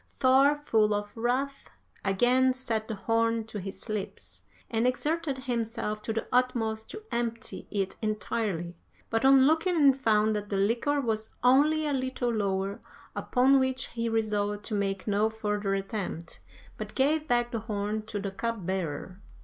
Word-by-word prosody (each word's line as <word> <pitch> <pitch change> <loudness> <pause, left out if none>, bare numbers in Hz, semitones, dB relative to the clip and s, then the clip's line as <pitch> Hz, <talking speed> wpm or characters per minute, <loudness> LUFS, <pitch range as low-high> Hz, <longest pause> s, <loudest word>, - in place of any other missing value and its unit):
"Thor, 270 +2 +4
full 215 -4 +3
of 205 0 -4
wrath, 255 +4 -1 0.3
again 245 +6 +3
set 225 -4 -2
the 220 - -3
horn 230 +2 +1
to 215 -1 -7
his 195 +3 -8
lips, 215 -3 -5 0.3
and 230 +1 +1
exerted 295 +2 -1
himself 230 -4 -2
to 225 - -3
the 225 0 -2
utmost 230 -3 +1
to 425 - -8
empty 235 0 -3
it 195 -2 -2
entirely, 210 -5 -2 0.4
but 225 +1 +1
on 270 0 +7
looking 325 +5 +3
in 285 -4 +6
found 220 -4 +2
that 205 -1 -4
the 200 - -1
liquor 235 +9 +1
was 220 -4 -1
only 295 +5 +4
a 290 - 0
little 260 -2 -1
lower, 195 -2 -1 0.3
upon 265 +2 +3
which 260 0 -1
he 230 -1 -2
resolved 210 -2 -1
to - - -4
make 195 -2 -1
no 210 +1 +2
further 210 -2 -1
attempt, 195 -4 -5 0.4
but - - -7
gave 300 +3 +2
back 240 -2 +1
the 230 - -2
horn 210 -1 -2
to 210 -1 -4
the 195 0 -3
cupbearer. 190 -5 -3
225 Hz, 155 wpm, -28 LUFS, 205-255 Hz, 0.4 s, on